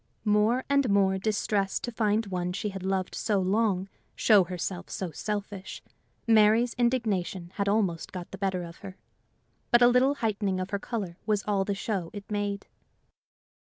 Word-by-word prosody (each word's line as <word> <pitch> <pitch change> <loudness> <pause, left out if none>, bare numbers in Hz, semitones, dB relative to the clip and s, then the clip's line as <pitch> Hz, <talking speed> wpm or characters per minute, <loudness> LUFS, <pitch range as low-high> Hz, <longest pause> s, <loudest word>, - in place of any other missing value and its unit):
More 215 +4 +3
and 280 -3 +2
more 195 -1 +3
distressed 200 -1 0
to 240 - -3
find 220 -1 +1
one 180 -2 -3
she 205 +3 -2
had 195 -1 -7
loved 190 0 -1
so 210 -3 0
long 195 0 +1 0.3
show 205 -5 +5
herself 180 +1 -5
so 185 -3 -4
selfish, 200 +2 -5 0.4
Mary's 225 +2 +4
indignation 210 -8 -1
had 200 -1 +1
almost 195 -6 0
got 180 -2 -7
the 195 - -8
better 190 -2 -1
of 170 -1 -9
her. 195 -1 -10 0.7
But 240 0 +5
a - - +8
little 255 +3 +4
heightening 205 -6 -1
of 185 +1 -4
her 200 - -1
color 195 -7 -4
was 210 -2 +1
all 200 -2 0
the 200 - -1
show 195 -4 -3
it 205 +1 -9
made. 205 -1 -2
200 Hz, 165 wpm, -28 LUFS, 190-220 Hz, 0.7 s, a